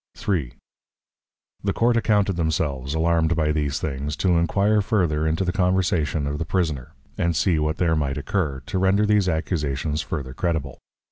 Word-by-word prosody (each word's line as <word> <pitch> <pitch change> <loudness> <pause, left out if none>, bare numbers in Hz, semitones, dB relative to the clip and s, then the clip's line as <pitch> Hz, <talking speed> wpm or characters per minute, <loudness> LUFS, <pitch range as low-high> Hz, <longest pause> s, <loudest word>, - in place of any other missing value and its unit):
_ 100 - 0
III. - - -8 1.1
The 100 -1 0
Court 120 +1 +2
accounted 105 -4 +2
themselves, 75 -4 -1
alarum'd 85 0 +2
by 80 -2 +1
these 75 -2 -1
Things, 75 0 -3
to 85 +2 +2
enquire 100 +5 +2
further 90 -8 +1
into 80 +4 0
the 90 - 0
Conversation 90 -6 +1
of 70 +1 -3
the - - 0
Prisoner; 80 -7 -2 0.3
and 85 -1 +1
see 85 0 +2
what 75 0 -1
there 85 -2 +2
might 70 -3 -1
occur, 75 -4 -2
to 95 - -2
render 95 +3 +3
these 105 -3 +3
Accusations 75 -2 -1
further 70 -4 -5
credible. 75 -4 -2
80 Hz, 165 wpm, -23 LUFS, 75-95 Hz, 1.1 s, render